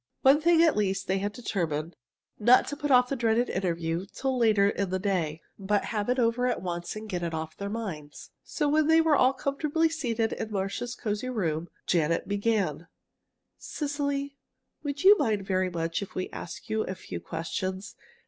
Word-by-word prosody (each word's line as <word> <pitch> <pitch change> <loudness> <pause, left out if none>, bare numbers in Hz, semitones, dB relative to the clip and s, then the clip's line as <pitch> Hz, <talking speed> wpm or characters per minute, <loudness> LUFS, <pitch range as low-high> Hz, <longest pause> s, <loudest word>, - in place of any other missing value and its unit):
One 275 +3 +6
thing 335 0 +5
at 325 - +4
least, 195 -2 0
they 190 +1 0
had 205 +1 -2
determined, 170 -8 -3 0.4
not 240 +4 +5
to 290 - -4
put 290 0 -3
off 250 -2 +5
the 275 - -1
dreaded 235 0 +1
interview 170 -1 -2
till 265 -1 -2
later 215 -5 +4
in 200 -1 -1
the 185 - 0
day, 175 -5 -1 0.2
but 200 +1 0
have 210 +1 -1
it 250 - +2
over 245 +1 +2
at 250 - 0
once 175 0 -4
and 215 +1 -7
get 180 -4 -3
it 170 -1 -2
off 160 0 -5
their 200 0 -5
minds. 180 -10 -6
So 300 - -1
when 305 +1 +3
they 320 0 +6
were 320 -2 +4
all 255 -1 +5
comfortably 295 +4 0
seated 235 -8 -1
in 220 - -4
Marcia's 200 +5 -3
cozy 215 +3 -3
room, 170 -8 -2 0.2
Janet 165 -1 +1
began: 200 -6 0 0.7
"Cecily, 285 -1 -3 0.4
would 285 +1 -4
you 400 +2 +9
mind 210 -4 0
very 185 -1 +1
much 165 0 -2
if 200 - -8
we 185 - -3
asked 170 +7 -8
you 220 -1 0
a 190 - -3
few - - -7
questions? 185 +4 -4
210 Hz, 185 wpm, -28 LUFS, 185-255 Hz, 0.7 s, you